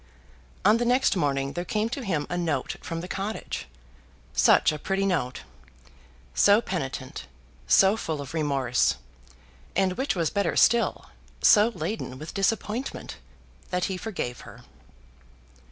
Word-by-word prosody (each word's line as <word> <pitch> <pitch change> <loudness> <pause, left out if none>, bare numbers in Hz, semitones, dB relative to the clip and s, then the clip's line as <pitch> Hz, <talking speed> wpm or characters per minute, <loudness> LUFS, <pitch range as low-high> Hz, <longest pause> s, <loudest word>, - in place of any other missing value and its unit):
On 210 +3 +6
the 240 - 0
next 250 0 +3
morning 140 -5 0
there 175 - -3
came 210 +4 -1
to 265 +2 -4
him 165 -9 -1
a 175 - -3
note 170 -2 -1
from 165 0 -5
the 180 - -7
cottage, 200 +4 -4 0.7
such - - +5
a 150 - -5
pretty 195 +5 -1
note! 160 -10 -1 0.9
so 205 - +5
penitent, 135 - -5 0.4
so 195 +2 +5
full 160 -9 -3
of 140 0 -7
remorse, 140 -6 +1 0.8
and, 190 0 +2
which 260 +1 -1
was 165 -4 0
better 200 -1 0
still, 235 +1 +3 0.4
so 210 0 +7
laden 205 -12 -4
with 155 +4 -8
disappointment, 220 +5 -2 0.5
that 180 0 -1
he 190 - -2
forgave 180 - -4
her. - - -13
180 Hz, 135 wpm, -26 LUFS, 145-210 Hz, 0.9 s, so